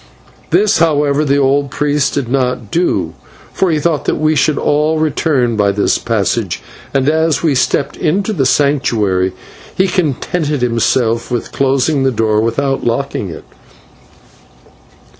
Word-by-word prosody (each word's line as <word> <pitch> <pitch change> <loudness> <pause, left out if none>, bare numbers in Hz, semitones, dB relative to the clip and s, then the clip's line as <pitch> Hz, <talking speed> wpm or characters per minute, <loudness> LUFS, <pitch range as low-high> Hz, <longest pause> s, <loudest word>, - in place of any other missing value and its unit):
This, 200 +5 +2
however, 150 -2 +2
the 140 -1 +1
old 140 0 +1
priest 145 0 0
did 140 -4 -1
not 125 -4 -1
do, 175 +2 0 0.4
for 190 - +1
he 160 - +1
thought 150 -2 -1
that - - +1
we 155 0 +1
should 150 +1 +2
all 150 +2 +1
return 145 -6 0
by 100 -2 +2
this 100 +1 +1
passage, - - -1 0.3
and 135 0 0
as 160 -1 +1
we 160 -3 +2
stepped 135 +1 0
into 195 +7 0
the 135 -9 +1
Sanctuary 110 -11 +1 0.4
he 190 - +2
contented 150 -4 -1
himself 115 -1 0
with 120 -2 -3
closing 135 +2 +1
the 135 - +2
door 110 -3 +1
without 135 +4 -1
locking 120 -4 -2
it. 80 - -9
140 Hz, 140 wpm, -15 LUFS, 125-155 Hz, 0.4 s, This